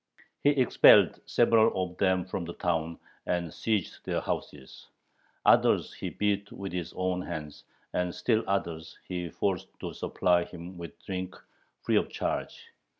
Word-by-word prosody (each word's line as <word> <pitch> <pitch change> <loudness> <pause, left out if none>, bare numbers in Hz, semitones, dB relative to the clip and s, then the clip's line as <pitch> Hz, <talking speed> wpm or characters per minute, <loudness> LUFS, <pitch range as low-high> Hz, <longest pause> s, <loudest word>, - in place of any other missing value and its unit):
He 145 - +6
expelled 135 -4 +6
several 115 -4 +4
of - - -15
them 95 -2 +2
from 95 -1 -4
the 85 - -7
town, 85 -1 -1 0.3
and 85 -3 -1
seized 110 -5 -2
their - - -1
houses. 65 -2 -6 0.6
Others - - +4
he - - -5
beat 100 -1 -1
with 100 -1 -6
his 90 -2 -3
own 90 0 -1
hands, 75 -5 -7 0.3
and 90 0 0
still 110 +5 +1
others 85 -5 -2
he 90 -2 -3
forced 95 +3 -1
to - - -5
supply 90 -1 +1
him 90 +1 -10
with 85 -2 -8
drink 95 -1 -4 0.5
free - - +2
of - - +1
charge. - - -4
90 Hz, 150 wpm, -29 LUFS, 85-100 Hz, 0.6 s, He